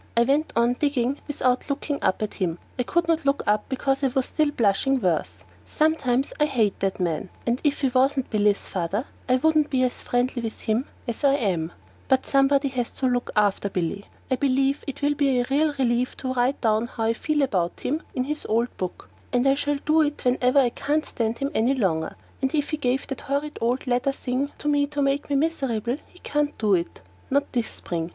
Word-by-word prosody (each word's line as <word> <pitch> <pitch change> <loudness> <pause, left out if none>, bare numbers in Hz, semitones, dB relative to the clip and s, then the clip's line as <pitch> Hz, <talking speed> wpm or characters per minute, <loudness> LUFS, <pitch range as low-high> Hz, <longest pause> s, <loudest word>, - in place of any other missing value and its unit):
I 235 - +6
went 285 +5 +1
on 235 +1 +3
digging 280 -2 0
without 255 -2 0
looking 280 +1 -2
up 190 - +1
at 210 - -3
him. 175 -4 -2 0.2
I - - +4
couldn't 330 +4 +1
look 275 0 +1
up 210 +4 +1
because 270 +1 0
I - - +5
was 260 0 -1
blushing 270 -3 +2
still 190 -8 +2
worse. 100 - -3 0.3
Sometimes 275 -4 +1
I 300 - +5
hate 225 -8 +1
that 195 0 -1
man, 175 +1 -1 0.2
and 240 +1 0
if 295 -2 +1
he 270 - +3
wasn't 265 +1 +1
Billy's 210 -2 +2
father 195 +6 -2 0.2
I 255 - +5
wouldn't 310 +2 +3
be 260 -2 +2
as 250 - -1
friendly 245 0 0
with 225 -1 -5
him 225 +5 0 0.2
as 235 +4 -4
I 280 -1 +5
am. 180 - -1 0.4
But 265 0 +2
somebody 275 0 +3
has 250 -3 -2
to 265 - -4
look 245 -1 0
after 205 -1 +2
Billy. 190 +2 -2 0.3
I 260 - +3
believe 275 +1 +1
it 280 +1 -6
will 290 +1 +3
be 275 -3 +2
a 245 - +1
real 300 +2 +3
relief 245 -1 +1
to 260 -1 -3
write 255 +2 +1
down 220 0 +2
how 230 - -5
I 225 +1 +2
feel 295 +4 0
about 185 -9 -1
him 305 +4 -1
in 255 - +1
his 300 +3 -3
old 235 +3 +1
book, 185 -1 -5 0.2
and 245 +1 +2
I 270 - +6
shall 290 +1 0
do 310 +1 +4
it 295 -3 -1
whenever 250 +1 +2
I 260 -3 +5
can't 295 +5 -1
stand 230 0 -2
him 275 +1 -2
any 245 +5 +2
longer; 165 -9 0 0.3
and 265 +3 0
if 295 0 0
he 310 - 0
gave 260 -2 0
the 270 - -6
horrid, 285 +2 -3
red 245 +4 0
leather 250 +1 +1
thing 270 +1 -2
to - - -5
me 290 -1 +3
to 290 0 -5
make 275 +1 0
me 285 - +1
miserable 270 -6 0
he - - -20
can't 295 0 -1
do 210 -2 +2
it; 170 - -1 0.3
not 280 +1 +1
this 240 -3 0
spring! 165 -1 -4
260 Hz, 215 wpm, -25 LUFS, 230-285 Hz, 0.4 s, I